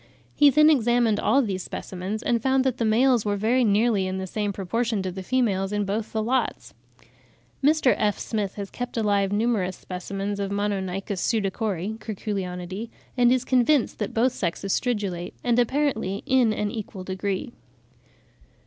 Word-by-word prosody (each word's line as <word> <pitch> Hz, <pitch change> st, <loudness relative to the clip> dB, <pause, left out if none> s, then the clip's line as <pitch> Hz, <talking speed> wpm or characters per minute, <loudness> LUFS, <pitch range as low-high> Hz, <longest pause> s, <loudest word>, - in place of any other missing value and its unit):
He 290 Hz, -1 st, +6 dB
then 305 Hz, +3 st, +6 dB
examined 240 Hz, -5 st, +2 dB
all 275 Hz, +1 st, +3 dB
these 195 Hz, -4 st, -2 dB
specimens, 190 Hz, +5 st, -5 dB
and 235 Hz, -1 st, +1 dB
found 265 Hz, +1 st, +2 dB
that 260 Hz, -2 st, 0 dB
the 230 Hz, -, 0 dB
males 240 Hz, +1 st, +3 dB
were 205 Hz, -1 st, 0 dB
very 235 Hz, +5 st, +2 dB
nearly 210 Hz, -2 st, +2 dB
in 185 Hz, 0 st, -3 dB
the 190 Hz, -, -3 dB
same 205 Hz, +2 st, -2 dB
proportion 210 Hz, +2 st, -1 dB
to 185 Hz, -, -3 dB
the 190 Hz, +1 st, -6 dB
females 195 Hz, -3 st, 0 dB
in 205 Hz, -1 st, 0 dB
both 210 Hz, +3 st, -3 dB
the 220 Hz, -1 st, -1 dB
lots. 255 Hz, +4 st, -1 dB, 0.9 s
Mr. 295 Hz, -2 st, +4 dB
F. 210 Hz, -1 st, 0 dB
Smith 210 Hz, -4 st, -3 dB
has 200 Hz, -2 st, -6 dB
kept 245 Hz, -1 st, -5 dB
alive 200 Hz, -3 st, +1 dB
numerous 205 Hz, -4 st, 0 dB
specimens 195 Hz, +2 st, -5 dB
of 200 Hz, -1 st, -2 dB
Monoynchus 195 Hz, -1 st, -2 dB
pseudacori 210 Hz, -1 st, -1 dB
(Curculionidae), 195 Hz, -1 st, -4 dB, 0.3 s
and 245 Hz, -1 st, +4 dB
is 255 Hz, 0 st, +2 dB
convinced 255 Hz, +1 st, +2 dB
that 210 Hz, -, -2 dB
both 245 Hz, +3 st, +2 dB
sexes 195 Hz, -2 st, -2 dB
stridulate, 200 Hz, -8 st, -2 dB
and 240 Hz, -1 st, +2 dB
apparently 245 Hz, -6 st, 0 dB
in 255 Hz, -4 st, +3 dB
an 210 Hz, -1 st, -1 dB
equal 205 Hz, -4 st, -6 dB
degree. 190 Hz, +4 st, -3 dB
210 Hz, 160 wpm, -25 LUFS, 195-240 Hz, 0.9 s, He